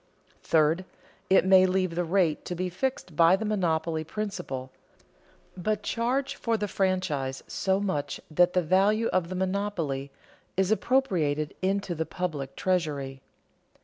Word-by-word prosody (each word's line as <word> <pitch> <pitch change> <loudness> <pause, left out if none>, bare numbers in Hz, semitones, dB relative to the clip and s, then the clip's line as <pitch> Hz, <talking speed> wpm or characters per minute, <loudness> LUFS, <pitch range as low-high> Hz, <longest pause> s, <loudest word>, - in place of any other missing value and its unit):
Third, 160 +3 +2 0.5
it 190 -1 +5
may 190 0 +6
leave 185 -1 0
the 175 +1 0
rate 170 -2 +1
to 180 - -4
be 180 +1 -2
fixed 180 - -3
by 165 +3 +6
the 220 - -4
monopoly 165 -6 0
principle, 160 -8 -5 0.8
but 210 +3 -2
charge 255 +4 0
for 230 -1 0
the 210 -1 -2
franchise 185 -10 -1
so 190 0 0
much 185 -8 -2
that 175 +3 +4
the 180 - +2
value 200 +7 +3
of 175 -2 0
the 185 - -4
monopoly 185 -8 -2 0.5
is 190 +1 +2
appropriated 175 - +1
into 195 -1 0
the 160 -1 -3
public 150 -7 -4
treasury. 145 -7 -1
185 Hz, 140 wpm, -27 LUFS, 160-195 Hz, 0.8 s, may